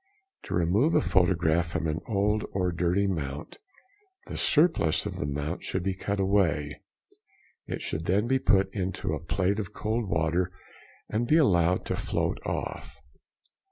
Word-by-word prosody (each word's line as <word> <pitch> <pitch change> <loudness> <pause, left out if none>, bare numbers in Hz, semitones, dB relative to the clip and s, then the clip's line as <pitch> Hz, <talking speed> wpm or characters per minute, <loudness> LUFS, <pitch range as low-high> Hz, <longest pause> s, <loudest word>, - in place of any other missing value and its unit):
To - - -3
remove 95 - +2
a - - +6
photograph 85 -2 +2
from 80 - -3
an 80 0 -1
old 105 0 +1
or 90 -2 0
dirty 90 +3 +1
mount, 75 -6 -4 0.7
the - - -7
surplus 155 - +2
of - - -4
the 75 - -2
mount 75 +4 -3
should 95 - -2
be 95 0 0
cut 100 +2 -3
away; 95 -7 +1 0.9
it - - -4
should 80 +1 -3
then 100 +5 +2
be 130 +2 +2
put 95 -5 +2
into 95 -5 -2
a 75 - -2
plate 95 +4 0
of 105 0 -5
cold 110 -1 -2
water 85 +2 +1 0.6
and 115 +3 -1
be 155 - +5
allowed 90 - +3
to - - -1
float - - -1
off. - - -5
95 Hz, 155 wpm, -28 LUFS, 85-100 Hz, 0.9 s, a